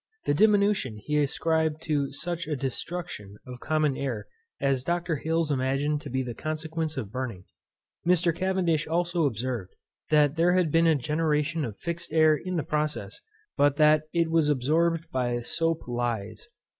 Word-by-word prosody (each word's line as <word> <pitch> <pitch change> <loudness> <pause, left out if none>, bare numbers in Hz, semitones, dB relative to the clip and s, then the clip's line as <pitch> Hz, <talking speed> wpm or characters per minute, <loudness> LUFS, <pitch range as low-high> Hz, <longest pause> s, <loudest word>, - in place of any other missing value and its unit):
This 145 - +2
diminution 200 - +3
he 150 +8 -1
ascribed 160 +2 0
to 145 -3 0
such 170 +3 -4
a 155 - -1
destruction 135 - -5
of 125 -1 -9
common 155 -1 +1
air 130 -7 -3 0.3
as 135 -2 +1
Dr. 170 0 -1
Hales 160 +1 0
imagined 140 +2 0
to - - -8
be 130 +1 -1
the 120 -2 -5
consequence 155 +3 -3
of 100 - -4
burning. 125 -8 -4 0.6
Mr. 170 -1 +2
Cavendish 180 -4 0
also 170 0 +1
observed, 120 -5 -4 0.3
that 150 0 +4
there 175 +2 +4
had 180 -4 +2
been 165 +1 +4
a 160 - +5
generation 150 +2 0
of 110 -6 -5
fixed 170 -1 -5
air 155 -1 +5
in 185 +4 -4
this 155 - -1
process, 150 0 -2 0.3
but 145 -1 +3
that 150 0 +5
it 170 -1 +1
was 160 -2 +3
absorbed 160 +5 +1
by 120 -2 0
sope 165 +6 -1
leys. 120 - -3
155 Hz, 160 wpm, -27 LUFS, 130-165 Hz, 0.6 s, a